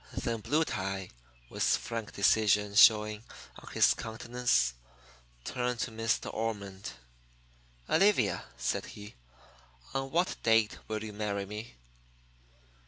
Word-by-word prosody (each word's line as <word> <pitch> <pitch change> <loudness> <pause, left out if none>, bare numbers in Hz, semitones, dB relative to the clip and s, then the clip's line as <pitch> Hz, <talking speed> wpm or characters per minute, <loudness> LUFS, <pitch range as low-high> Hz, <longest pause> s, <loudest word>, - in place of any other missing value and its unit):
Then 115 -2 -2
Blue 155 +8 +1
Tie, 95 -4 -4 0.4
with - - -7
frank 115 -2 0
decision 105 0 +3
showing 105 0 +5 0.4
on - - -12
his - - +5
countenance, 110 - 0 0.7
turned 125 - -2
to 125 - -2
Miss 115 0 0
De - - -9
Ormond. 100 - -4 0.9
"Olivia," 195 - +3
said 60 - -2
he, 105 0 -10 0.8
"on 135 0 -2
what 175 +5 0
date 110 -2 +3
will 110 0 -3
you 110 -1 -7
marry 100 -1 -2
me?" 105 +3 -8
110 Hz, 115 wpm, -30 LUFS, 100-115 Hz, 0.9 s, showing